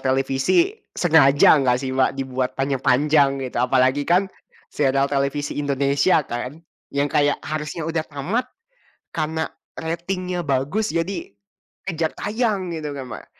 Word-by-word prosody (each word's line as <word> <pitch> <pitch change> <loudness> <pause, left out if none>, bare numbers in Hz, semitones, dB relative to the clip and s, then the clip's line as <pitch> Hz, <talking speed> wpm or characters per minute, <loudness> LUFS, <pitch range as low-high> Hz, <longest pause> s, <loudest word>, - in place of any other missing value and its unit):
televisi, 135 - +2 0.2
sengaja 155 -3 +6
enggak 125 -1 +2
sih 130 -1 -3
Mbak 130 0 +2
dibuat 130 -1 -2
panjang-panjang, 135 +1 +2
gitu. 125 -2 -4
Apalagi 130 +2 +2
kan, 185 +3 +3 0.4
serial 135 -1 +2
televisi 140 +1 -1
Indonesia 140 +3 +2
kan, 125 +6 -5 0.3
yang 140 +1 +1
kayak 145 -1 +2
harusnya 155 +1 -4
udah 160 -1 -1
tamat, 165 - -2 0.7
karena 160 0 -1 0.3
ratingnya 175 +2 -3
bagus 145 +10 0
jadi 170 - -3 0.6
kejar 165 -3 -1
tayang 210 -4 -1
gitu 150 -2 -4
kan, 135 -2 -6
Mbak. - - -8
145 Hz, 125 wpm, -22 LUFS, 135-165 Hz, 0.7 s, sengaja